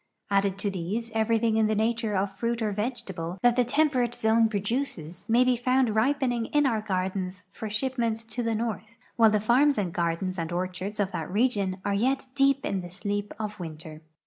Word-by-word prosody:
Added 195 Hz, -1 st, +2 dB
to 200 Hz, 0 st, -1 dB
these, 200 Hz, +6 st, -3 dB
everything 225 Hz, 0 st, +2 dB
in 220 Hz, -1 st, +4 dB
the 215 Hz, -, +1 dB
nature 220 Hz, 0 st, 0 dB
of 195 Hz, 0 st, -1 dB
fruit 230 Hz, +2 st, -1 dB
or 215 Hz, -, 0 dB
vegetable 195 Hz, -6 st, -4 dB
that 245 Hz, -1 st, +5 dB
the 250 Hz, -, +4 dB
temperate 250 Hz, -2 st, +1 dB
zone 225 Hz, 0 st, +3 dB
produces 205 Hz, -, -3 dB
may 240 Hz, +2 st, +5 dB
be 255 Hz, 0 st, +3 dB
found 255 Hz, -1 st, +2 dB
ripening 245 Hz, 0 st, +1 dB
in 295 Hz, -1 st, +2 dB
our 225 Hz, -5 st, +1 dB
gardens 185 Hz, -2 st, -2 dB
for 220 Hz, +2 st, -6 dB
shipment 230 Hz, 0 st, 0 dB
to 245 Hz, +3 st, -2 dB
the 230 Hz, -1 st, 0 dB
north 225 Hz, 0 st, -4 dB, 0.2 s
while 225 Hz, -1 st, +6 dB
the 210 Hz, 0 st, +2 dB
farms 255 Hz, +7 st, +3 dB
and 185 Hz, -5 st, -1 dB
gardens 175 Hz, +2 st, -1 dB
and 165 Hz, 0 st, -3 dB
orchards 185 Hz, +4 st, -3 dB
of 200 Hz, -1 st, +1 dB
that 160 Hz, -4 st, -4 dB
region 205 Hz, -4 st, +1 dB
are 200 Hz, -, +1 dB
}'^et 260 Hz, +5 st, 0 dB
deep 275 Hz, -1 st, +3 dB
in 195 Hz, -1 st, -1 dB
the 175 Hz, -, -8 dB
sleep 205 Hz, +3 st, -3 dB
of 210 Hz, -1 st, -5 dB
winter. 155 Hz, -2 st, -8 dB
215 Hz, 195 wpm, -27 LUFS, 190-240 Hz, 0.2 s, while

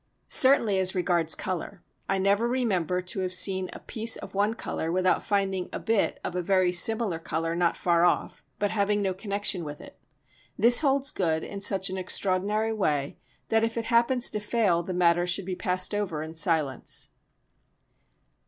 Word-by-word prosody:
Certainly 235 Hz, -7 st, +6 dB
as 185 Hz, +1 st, +1 dB
regards 175 Hz, -3 st, +2 dB
colour, 185 Hz, +1 st, -6 dB, 0.3 s
I 195 Hz, -, +1 dB
never 200 Hz, +4 st, +1 dB
remember 185 Hz, -8 st, -1 dB
to 190 Hz, +3 st, -3 dB
have 185 Hz, -1 st, -2 dB
seen 190 Hz, 0 st, +3 dB
a -, -, -9 dB
piece 225 Hz, 0 st, +2 dB
of -, -, -9 dB
one 205 Hz, +3 st, 0 dB
colour 165 Hz, -7 st, -5 dB
without 185 Hz, +1 st, +1 dB
finding 195 Hz, -3 st, -2 dB
a -, -, -5 dB
bit 225 Hz, -3 st, -1 dB
of -, -, -5 dB
a 180 Hz, -, -1 dB
very 185 Hz, 0 st, +1 dB
similar 210 Hz, -1 st, +3 dB
colour 165 Hz, 0 st, -3 dB
not 170 Hz, -1 st, 0 dB
far 170 Hz, -1 st, +1 dB
off, 175 Hz, -, -1 dB
but 205 Hz, -1 st, -2 dB
having 205 Hz, 0 st, 0 dB
no 190 Hz, -1 st, -1 dB
connection 200 Hz, -2 st, -1 dB
with 150 Hz, -1 st, -8 dB
it. -, -, -14 dB, 0.6 s
This 240 Hz, +1 st, +6 dB
holds 275 Hz, -2 st, +1 dB
good 160 Hz, -3 st, -2 dB
in 200 Hz, -1 st, -8 dB
such 195 Hz, -1 st, +1 dB
an 190 Hz, -, -4 dB
extraordinary 200 Hz, +4 st, 0 dB
way 150 Hz, -9 st, -2 dB, 0.3 s
that 225 Hz, 0 st, +1 dB
if 225 Hz, +1 st, -2 dB
it 230 Hz, -, -3 dB
happens 240 Hz, +1 st, +2 dB
to 210 Hz, -, -3 dB
fail 210 Hz, -5 st, 0 dB
the 175 Hz, -, -7 dB
matter 175 Hz, 0 st, +2 dB
should 180 Hz, +2 st, -2 dB
be 185 Hz, -1 st, -4 dB
passed 185 Hz, 0 st, +1 dB
over 185 Hz, -7 st, -3 dB
in 160 Hz, 0 st, -9 dB
silence. 160 Hz, -6 st, 0 dB
190 Hz, 180 wpm, -26 LUFS, 175-215 Hz, 0.6 s, Certainly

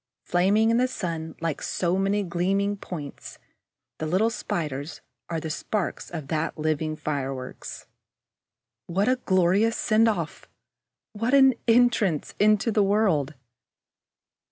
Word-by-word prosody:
Flaming 200 Hz, +6 st, +3 dB
in 230 Hz, -, +3 dB
the 250 Hz, +1 st, +3 dB
sun 165 Hz, -9 st, -4 dB
like 165 Hz, -3 st, -2 dB
so 175 Hz, 0 st, 0 dB
many 195 Hz, +2 st, +1 dB
gleaming 195 Hz, +3 st, 0 dB
points, 160 Hz, -7 st, -8 dB, 0.6 s
the 155 Hz, -, -2 dB
little 195 Hz, +8 st, +2 dB
Spiders 150 Hz, -7 st, -4 dB, 0.3 s
are 165 Hz, -1 st, -2 dB
the 160 Hz, 0 st, -5 dB
sparks 200 Hz, +4 st, -3 dB
of 160 Hz, -5 st, -6 dB
that 160 Hz, +1 st, -1 dB
living 155 Hz, 0 st, -1 dB
fireworks. 135 Hz, -4 st, -5 dB, 1.0 s
What 195 Hz, +5 st, 0 dB
a 255 Hz, 0 st, +3 dB
glorious 190 Hz, +5 st, +3 dB
send 225 Hz, +1 st, +3 dB
off! 220 Hz, -, -2 dB, 0.7 s
What 230 Hz, +5 st, +1 dB
an 265 Hz, -1 st, +7 dB
entrance 230 Hz, -8 st, +3 dB
into 215 Hz, +2 st, +3 dB
the 215 Hz, -, +3 dB
world! 195 Hz, -8 st, +2 dB
185 Hz, 125 wpm, -25 LUFS, 160-215 Hz, 1.0 s, an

